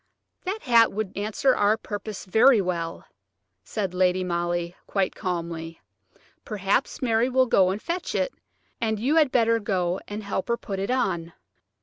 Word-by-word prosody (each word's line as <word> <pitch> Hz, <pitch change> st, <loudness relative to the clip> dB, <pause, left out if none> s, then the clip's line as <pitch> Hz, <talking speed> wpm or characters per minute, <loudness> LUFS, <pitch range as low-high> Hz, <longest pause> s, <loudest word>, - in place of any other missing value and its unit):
"That 400 Hz, +4 st, -3 dB
hat 235 Hz, -4 st, +5 dB
would 210 Hz, -2 st, -4 dB
answer 215 Hz, +6 st, +1 dB
our 205 Hz, +2 st, +3 dB
purpose 210 Hz, -2 st, -6 dB
very 225 Hz, +5 st, +5 dB
well," 170 Hz, -3 st, -3 dB, 0.6 s
said 195 Hz, -4 st, -3 dB
Lady 185 Hz, 0 st, +2 dB
Molly, 175 Hz, 0 st, -2 dB
quite 195 Hz, -2 st, 0 dB
calmly. 165 Hz, -2 st, -4 dB, 0.6 s
"Perhaps 205 Hz, +5 st, -1 dB
Mary 230 Hz, 0 st, +2 dB
will 260 Hz, 0 st, +3 dB
go 190 Hz, -6 st, +4 dB
and 195 Hz, +2 st, -2 dB
fetch 345 Hz, +8 st, -3 dB
it, -, -, 0 dB, 0.5 s
and 220 Hz, -2 st, 0 dB
you 275 Hz, +8 st, +2 dB
had 300 Hz, -5 st, +4 dB
better 230 Hz, -1 st, +3 dB
go 185 Hz, -4 st, -1 dB
and 210 Hz, +1 st, -5 dB
help 195 Hz, -1 st, -3 dB
her 235 Hz, 0 st, +1 dB
put 195 Hz, -4 st, -5 dB
it 195 Hz, -, -2 dB
on." 170 Hz, -10 st, -1 dB
205 Hz, 155 wpm, -25 LUFS, 180-235 Hz, 0.6 s, hat